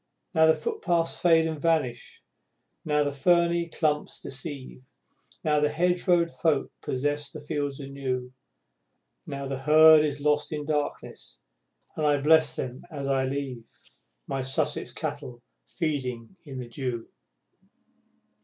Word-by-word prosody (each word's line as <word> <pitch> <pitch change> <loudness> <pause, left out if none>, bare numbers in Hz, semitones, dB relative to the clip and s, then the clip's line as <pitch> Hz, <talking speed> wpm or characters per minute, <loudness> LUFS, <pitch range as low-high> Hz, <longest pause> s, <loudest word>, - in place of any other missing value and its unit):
Now 160 -2 +5
the 160 - +5
footpaths 165 +2 -1
fade 165 -2 +4
and 160 -2 -3
vanish; 145 -8 -1 0.6
now 150 -1 +2
the 145 - -1
ferny 170 +3 +2
clumps 150 -3 -1
deceive; 135 -2 -8 0.5
Now 150 -1 +2
the 150 0 +2
hedgerow 175 +2 +2
folk 160 -3 0
possess 145 +2 -2
their 155 - -9
fields 145 -1 -3
anew; 130 -2 -4 0.9
Now 140 0 -5
the 135 -1 -4
Herd 155 +2 +7
is 145 -1 -2
lost 150 0 +1
in 150 -1 -3
darkness, 150 -1 -4 0.6
and 155 - -3
I 145 -1 +3
bless 160 +3 +4
them 125 0 -5
as 140 -4 -5
I 135 -1 +1
leave, 130 -4 -4 0.6
My 135 - -3
Sussex 130 +1 -1
Cattle 120 -1 -6 0.2
feeding 130 -6 -3
in 135 -3 -8
the 125 -1 -6
dew! 120 -1 -4
145 Hz, 130 wpm, -27 LUFS, 135-160 Hz, 0.9 s, Herd